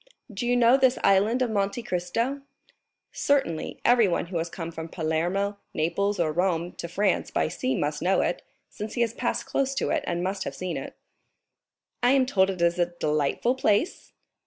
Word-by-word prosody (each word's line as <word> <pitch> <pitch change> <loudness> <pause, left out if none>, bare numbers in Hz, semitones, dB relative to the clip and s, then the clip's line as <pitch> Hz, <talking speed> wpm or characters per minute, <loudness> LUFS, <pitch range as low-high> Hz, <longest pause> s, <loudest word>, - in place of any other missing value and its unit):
"Do 225 +5 -3
you 245 0 +3
know 240 +2 +6
this 260 -1 +3
Island 210 +6 +3
of 240 - -1
Monte 200 +3 -1
Cristo?" 230 +10 -2 0.7
"Certainly, 270 - 0
everyone 230 -9 +4
who 170 -1 -3
has 165 +1 -3
come 170 -1 -6
from 160 0 -7
Palermo, 175 +6 -1 0.2
Naples, 200 +6 0
or 160 -2 +1
Rome 175 0 0
to - - -5
France 195 +3 0
by - - 0
sea 130 -4 -2
must 150 +2 -2
know 185 +3 +2
it, - - -1 0.3
since 210 +1 -7
he 240 - 0
has 230 -1 +1
passed - - -2
close 275 0 -1
to - - -1
it - - 0
and 175 0 -1
must 190 +1 -2
have - - -5
seen 185 -1 -4
it." - - -6 1.1
"I 245 +2 +4
am 270 -2 +4
told 195 -7 +2
it 180 -3 -2
is 170 +1 +2
a 175 - +3
delightful 150 - +1
place?" 260 - 0
195 Hz, 185 wpm, -26 LUFS, 170-235 Hz, 1.1 s, know